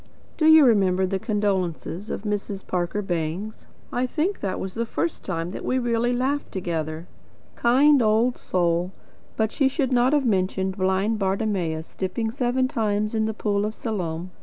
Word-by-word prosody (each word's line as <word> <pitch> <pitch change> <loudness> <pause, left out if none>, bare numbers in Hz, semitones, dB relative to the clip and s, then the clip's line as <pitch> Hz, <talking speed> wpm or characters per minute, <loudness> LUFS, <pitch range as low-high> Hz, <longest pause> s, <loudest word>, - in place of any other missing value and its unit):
Do 310 - +2
you 315 -2 +8
remember 190 -5 +3
the 190 +1 -2
condolences 195 -2 -2
of - - -4
Mrs. 205 -2 -3
Parker 180 +3 -2
Bangs? 175 +4 -4 0.3
I 250 +1 0
think 335 +9 -1
that 195 -2 -3
was 190 -1 -5
the 230 - -1
first 335 +8 -2
time 170 -2 -3
we 255 - 0
really 240 -1 +1
laughed 265 +4 -1
together. 165 -3 -3 0.5
Kind 270 +4 +5
old 225 +3 +3
soul! 175 0 0 0.4
But 220 0 +1
she 275 - +2
should 265 -1 -1
not 250 +2 +3
have 290 -3 +2
mentioned 190 -2 0
blind 195 +3 +1
Bartimaeus 190 -5 -1
dipping 220 +4 -2
seven 255 +1 0
times 215 -3 -1
in 220 -1 +1
the 220 - -2
pool 205 -2 0
of 215 +1 -3
Siloam. 180 -5 -4
210 Hz, 160 wpm, -24 LUFS, 185-240 Hz, 0.5 s, you